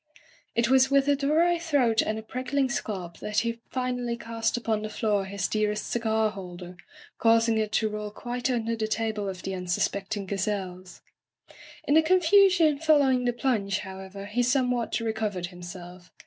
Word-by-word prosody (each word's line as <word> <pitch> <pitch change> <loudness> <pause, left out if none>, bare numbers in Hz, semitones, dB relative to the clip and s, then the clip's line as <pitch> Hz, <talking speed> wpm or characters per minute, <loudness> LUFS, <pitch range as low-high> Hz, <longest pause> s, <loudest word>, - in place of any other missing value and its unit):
It 235 0 +2
was 265 +1 +5
with 275 0 +3
a 285 - +4
dry 320 +5 +2
throat 275 -9 +2
and 215 - -2
a 220 - -6
prickling 260 +4 -1
scalp 185 -7 -4
that 210 +1 0
he 230 0 -3
finally 250 -2 -2
cast 230 0 -2
upon 225 -3 -1
the 215 - -4
floor 210 -2 0
his 195 0 -2
dearest 210 0 -1
cigar 220 -2 +1
holder, 180 -2 -9 0.4
causing 225 -1 +4
it 215 -1 -1
to 220 - +2
roll 210 0 -4
quite 245 +4 -4
under 230 -2 0
the 220 -1 -2
table 215 -2 -2
of 185 -1 -7
the 195 - -3
unsuspecting 195 +3 -2
gazelles. 185 -2 -4 0.8
In 285 - +1
the 320 - +7
confusion 350 -2 +4
following 285 -5 +3
the 245 - +3
plunge, 210 -6 0
how 190 0 -8
ever, 195 +1 -8
he 215 +4 -1
somewhat 250 -2 +1
recovered 220 -5 -2
himself. 175 0 -10
220 Hz, 165 wpm, -27 LUFS, 200-255 Hz, 0.8 s, the